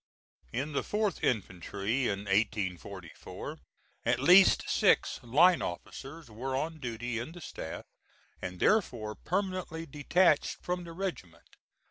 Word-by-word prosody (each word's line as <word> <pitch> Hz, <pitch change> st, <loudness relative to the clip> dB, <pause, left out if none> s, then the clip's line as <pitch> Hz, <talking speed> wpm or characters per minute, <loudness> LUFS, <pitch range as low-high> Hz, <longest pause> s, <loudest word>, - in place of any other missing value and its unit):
In 135 Hz, +6 st, -3 dB
the -, -, +1 dB
4th 210 Hz, -3 st, -1 dB
infantry, 105 Hz, +3 st, -1 dB
in 100 Hz, -1 st, -1 dB
1844, 100 Hz, -3 st, -3 dB, 0.4 s
at -, -, +2 dB
least 185 Hz, +2 st, +6 dB
six -, -, +3 dB
line 165 Hz, +9 st, +5 dB
officers 135 Hz, -, -6 dB
were 125 Hz, +4 st, -4 dB
on 160 Hz, +4 st, -2 dB
duty 120 Hz, -2 st, -3 dB
in 130 Hz, +8 st, -6 dB
the 175 Hz, -, -10 dB
staff, 80 Hz, -, -7 dB, 0.6 s
and 90 Hz, 0 st, -5 dB
therefore 120 Hz, -, +2 dB
permanently 185 Hz, -, -3 dB
detached 150 Hz, +2 st, +2 dB
from 180 Hz, 0 st, -3 dB
the 165 Hz, -, -8 dB
regiment. 175 Hz, -, -6 dB
135 Hz, 120 wpm, -31 LUFS, 105-170 Hz, 0.6 s, least